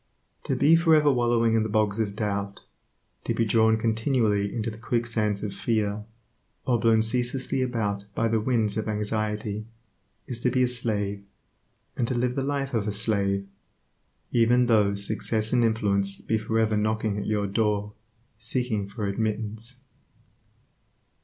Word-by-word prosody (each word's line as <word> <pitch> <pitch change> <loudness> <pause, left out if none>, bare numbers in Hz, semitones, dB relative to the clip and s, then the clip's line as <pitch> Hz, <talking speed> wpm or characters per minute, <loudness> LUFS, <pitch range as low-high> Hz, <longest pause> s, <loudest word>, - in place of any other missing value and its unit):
To - - 0
be 155 +3 +5
for 165 -1 +5
ever 150 -1 +4
wallowing 120 -2 +2
in 115 - +3
the 110 - -2
bogs 105 0 +1
of 105 -2 -1
doubt, 100 -2 -3 0.6
to - - -1
be 115 - +1
drawn 110 0 +3
continually 110 -2 +1
into 115 -1 -2
the 110 - -11
quicksands 115 -3 -1
of 105 - -3
fear, 105 -2 -1 0.6
or 120 -2 +2
blown 110 -1 +3
ceaselessly 125 +3 -1
about 105 -5 -1
by 115 - +1
the 115 0 +1
winds 110 -3 0
of 110 - -2
anxiety, 105 0 -2 0.6
is 120 -2 -3
to 125 - +1
be 130 +1 +2
a - - +3
slave, 105 -5 -1 0.7
and 120 - 0
to 130 - -1
live 125 +1 0
the 135 - -2
life 140 0 -2
of 110 -3 0
a - - 0
slave, 100 -2 0 0.8
even 120 +1 +4
though 105 -4 +3
success 110 +2 0
and 120 -1 +4
influence 100 -3 +1
be 110 - -1
for 110 +1 -2
ever 110 -1 +2
knocking 110 -1 0
at 100 - -4
your 105 -1 0
door 105 0 0 0.5
seeking 110 -3 -1
for 105 0 -4
admittance. 110 +3 -3
110 Hz, 160 wpm, -26 LUFS, 105-120 Hz, 0.8 s, be